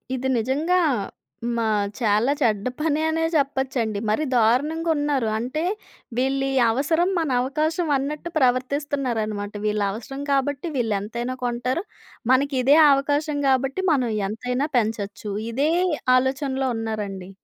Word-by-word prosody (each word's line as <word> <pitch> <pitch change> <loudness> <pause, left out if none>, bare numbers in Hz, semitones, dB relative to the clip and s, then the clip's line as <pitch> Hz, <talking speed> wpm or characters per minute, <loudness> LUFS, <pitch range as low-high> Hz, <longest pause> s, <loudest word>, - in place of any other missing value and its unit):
ఇది 260 +1 -2
నిజంగా. 290 +10 +1 0.8
మా 230 - 0 0.3
చాలా 220 +3 +2
చెడ్డ 215 -5 +1
పనె 305 0 +1
అనే 325 +1 0
చెప్పొచ్చండి. 265 -7 0
మరి 215 +9 +1
దారుణంగ 275 +8 +2
ఉన్నారు. 290 -5 0
అంటే 255 +7 -2 0.5
'వీళ్ళి 270 +1 +1 0.2
అవసరం 320 +8 +1
మన 320 -3 -1
అవకాశం' 310 +5 -1
అన్నట్టు 295 +5 -4
ప్రవర్తిస్తున్నారనమాట. 255 -5 0
"వీళ్ళ 210 0 0
అవసరం 270 +6 -7
కాబట్టి 280 +3 0
వీళ్ళు 225 -4 0
ఎంతైనా 235 +5 -4
కొంటారు. 245 +6 -1 0.5
మనకి 275 +1 +2
ఇదే 280 +4 +6 0.2
అవకాశం 290 +2 0
గాబట్టి 270 +7 +1
మనం 255 -6 +2 0.2
ఎంతైనా 250 +6 -2
పెంచొచ్చు." 210 -2 -2 0.2
ఇదే 275 +6 +1 0.5
ఆలోచనలో 265 0 0
ఉన్నారండి. 205 -4 -4
265 Hz, 115 wpm, -23 LUFS, 230-290 Hz, 0.8 s, ఇదే